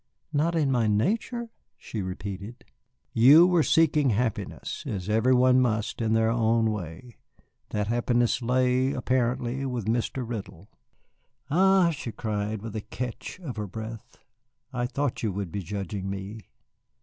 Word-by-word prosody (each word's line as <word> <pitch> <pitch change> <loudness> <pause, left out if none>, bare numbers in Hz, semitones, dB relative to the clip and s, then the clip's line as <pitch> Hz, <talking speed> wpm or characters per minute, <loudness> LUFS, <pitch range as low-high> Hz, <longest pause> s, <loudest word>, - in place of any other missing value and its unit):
"Not 160 +4 +1
in 150 -4 +2
my 120 -4 +2
nature?" 225 - 0 0.3
she 110 - -5
repeated. 100 +4 -6 0.5
"You 140 +9 +8
were 180 -2 +4
seeking 150 -3 +3
happiness, 115 0 -2
as 95 -3 -4
every 110 +4 +3
one 130 +1 +5
must 110 -2 -1
in 110 -1 +1
their 110 0 +3
own 115 -1 +2
way. 105 +4 -7 0.5
That 105 -1 -1
happiness 120 +2 +1
lay, 130 +2 +2
apparently, 125 0 0
with 125 -4 -3
Mr. 120 +2 -1
Riddle." 100 -5 -7 0.8
"Ah," 190 +1 +5
she 145 -6 -5
cried, 105 -1 -3
with 110 -1 -6
a 110 - -2
catch 125 - -6
of 135 -10 -6
her 105 -1 -3
breath, 110 +2 -8 0.6
"I 120 -1 -1
thought 140 +1 -2
you 110 - 0
would 95 -3 -4
be 100 - -3
judging 95 +1 -4
me." 100 +1 -6
115 Hz, 145 wpm, -27 LUFS, 105-130 Hz, 0.8 s, You